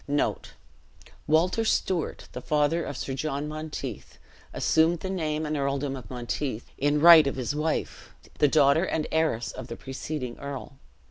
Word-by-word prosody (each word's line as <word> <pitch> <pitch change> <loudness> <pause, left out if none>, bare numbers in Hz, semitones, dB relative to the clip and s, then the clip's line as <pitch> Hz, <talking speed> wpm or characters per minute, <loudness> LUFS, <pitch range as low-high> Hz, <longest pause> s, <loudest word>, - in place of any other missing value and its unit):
Walter 170 +8 +2
Stewart, 185 -6 -1
the 125 - -7
father 150 +4 +1
of 140 - -5
Sir 135 - -4
John 145 +1 -3
Monteith, 150 -6 -6 0.3
assumed 160 +1 +2
the 190 - -3
name 155 -4 -2
and 150 0 -2
earldom 140 -1 -1
of 120 -6 -10
Monteith 125 0 -4
in 145 +2 +2
right 160 -2 +9
of 140 - -1
his 130 +1 -2
wife, 155 +1 -2 0.3
the 150 - +5
daughter 145 +2 +4
and 160 -4 -1
heiress 155 -8 0
of - - -8
the 115 - -6
preceding 135 -1 -6
earl. 140 0 -7
150 Hz, 150 wpm, -27 LUFS, 135-160 Hz, 0.3 s, right